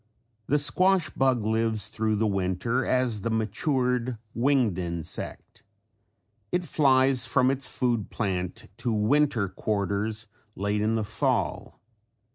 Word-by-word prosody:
] 110 Hz, -2 st, -45 dB
The 150 Hz, -, +3 dB
squash 185 Hz, +5 st, +3 dB
bug 130 Hz, -5 st, +1 dB
lives 110 Hz, -1 st, +1 dB
thru 110 Hz, 0 st, -1 dB
the 110 Hz, +2 st, +1 dB
winter 100 Hz, +5 st, 0 dB
as 125 Hz, -5 st, 0 dB
the 115 Hz, -, -2 dB
matured 125 Hz, +2 st, 0 dB, 0.2 s
winged 120 Hz, -6 st, +2 dB
insect. 85 Hz, -2 st, -5 dB, 0.9 s
It 180 Hz, 0 st, 0 dB
flies 130 Hz, -4 st, +3 dB
from 130 Hz, -1 st, +3 dB
its 135 Hz, -1 st, -3 dB
food 120 Hz, -5 st, 0 dB
plant 95 Hz, -4 st, -3 dB
to 120 Hz, 0 st, -1 dB
winter 110 Hz, +1 st, +2 dB
quarters 105 Hz, +3 st, -2 dB, 0.3 s
late 100 Hz, +1 st, -1 dB
in 110 Hz, +1 st, +1 dB
the 110 Hz, -, 0 dB
fall. 105 Hz, -, -1 dB
115 Hz, 125 wpm, -27 LUFS, 105-130 Hz, 0.9 s, The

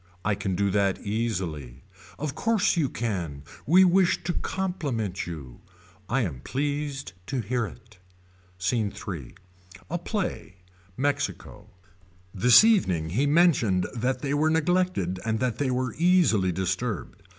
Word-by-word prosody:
I 105 Hz, -, +2 dB
can 100 Hz, -2 st, -2 dB
do 100 Hz, +1 st, +1 dB
that 100 Hz, -1 st, +2 dB
easily. 90 Hz, -, -3 dB, 0.3 s
Of 145 Hz, -1 st, -3 dB
course 220 Hz, +4 st, +1 dB
you 155 Hz, -6 st, +1 dB
can 90 Hz, -13 st, -3 dB, 0.2 s
we 180 Hz, +6 st, +7 dB
wish 185 Hz, 0 st, +3 dB
to 175 Hz, +1 st, -1 dB
compliment 140 Hz, -, -3 dB
you. 70 Hz, -8 st, -8 dB, 0.5 s
I 135 Hz, +4 st, +2 dB
am 80 Hz, -, -3 dB
pleased 145 Hz, -, -3 dB
to 135 Hz, -, -2 dB
hear 120 Hz, +1 st, -1 dB
it. 110 Hz, -3 st, -15 dB, 0.6 s
SCENE 100 Hz, +3 st, 0 dB
III. 80 Hz, -10 st, -7 dB, 0.6 s
A 175 Hz, -, -1 dB
play. 175 Hz, -, -4 dB, 0.4 s
Mexico. 145 Hz, +2 st, -2 dB, 0.7 s
This 115 Hz, -, +7 dB
evening 95 Hz, -, +2 dB
he 130 Hz, +10 st, +1 dB
mentioned 140 Hz, -, +3 dB
that 125 Hz, +2 st, -1 dB
they 140 Hz, 0 st, -1 dB
were 150 Hz, +2 st, +2 dB
neglected 160 Hz, -, +1 dB
and 110 Hz, -1 st, -1 dB
that 125 Hz, -3 st, -1 dB
they 140 Hz, -2 st, +1 dB
were 125 Hz, -1 st, -1 dB
easily 165 Hz, -, +3 dB
disturbed. 95 Hz, +4 st, -3 dB
120 Hz, 135 wpm, -26 LUFS, 95-155 Hz, 0.7 s, we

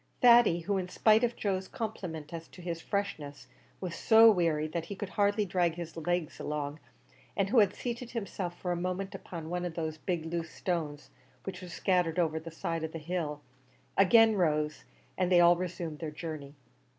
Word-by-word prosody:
Thady, 235 Hz, -8 st, +6 dB
who, 195 Hz, +3 st, 0 dB
in 180 Hz, -1 st, -4 dB
spite 215 Hz, +4 st, +4 dB
of 240 Hz, 0 st, +1 dB
Joe's 190 Hz, -2 st, -2 dB
compliment 175 Hz, -9 st, -5 dB
as 165 Hz, 0 st, -6 dB
to 180 Hz, -, -14 dB
his 170 Hz, -1 st, -4 dB
freshness, 150 Hz, -, -3 dB, 0.3 s
was 180 Hz, -3 st, -4 dB
so 225 Hz, +5 st, +7 dB
weary 165 Hz, -5 st, +1 dB
that 165 Hz, +1 st, -4 dB
he 200 Hz, -, -6 dB
could 195 Hz, 0 st, -5 dB
hardly 205 Hz, +1 st, +2 dB
drag 175 Hz, -3 st, +1 dB
his 170 Hz, -1 st, -7 dB
legs 175 Hz, 0 st, -2 dB
along, 150 Hz, 0 st, -3 dB, 0.6 s
and 195 Hz, -1 st, +1 dB
who 245 Hz, -, +6 dB
had 205 Hz, -3 st, +5 dB
seated 240 Hz, 0 st, -4 dB
himself 195 Hz, -6 st, -4 dB
for 180 Hz, -, -2 dB
a -, -, +1 dB
moment 185 Hz, +2 st, -3 dB
upon 165 Hz, -2 st, -7 dB
one 180 Hz, 0 st, -2 dB
of 175 Hz, -2 st, -4 dB
the 160 Hz, -2 st, -3 dB
big 175 Hz, -4 st, -1 dB
loose 165 Hz, 0 st, -3 dB
stones 155 Hz, -6 st, -3 dB, 0.3 s
which 190 Hz, 0 st, -6 dB
were 180 Hz, -, -8 dB
scattered 180 Hz, -1 st, 0 dB
over 160 Hz, -2 st, +1 dB
the 165 Hz, +1 st, -8 dB
side 165 Hz, 0 st, -3 dB
of 160 Hz, -, -4 dB
the -, -, -4 dB
hill, 155 Hz, -2 st, -3 dB, 0.5 s
again 220 Hz, +3 st, +6 dB
rose, 150 Hz, -5 st, 0 dB, 0.3 s
and 185 Hz, 0 st, +1 dB
they 180 Hz, -, +7 dB
all 175 Hz, 0 st, +7 dB
resumed 170 Hz, -3 st, -5 dB
their 160 Hz, -, -4 dB
journey. 150 Hz, -2 st, -7 dB
175 Hz, 190 wpm, -30 LUFS, 160-195 Hz, 0.6 s, so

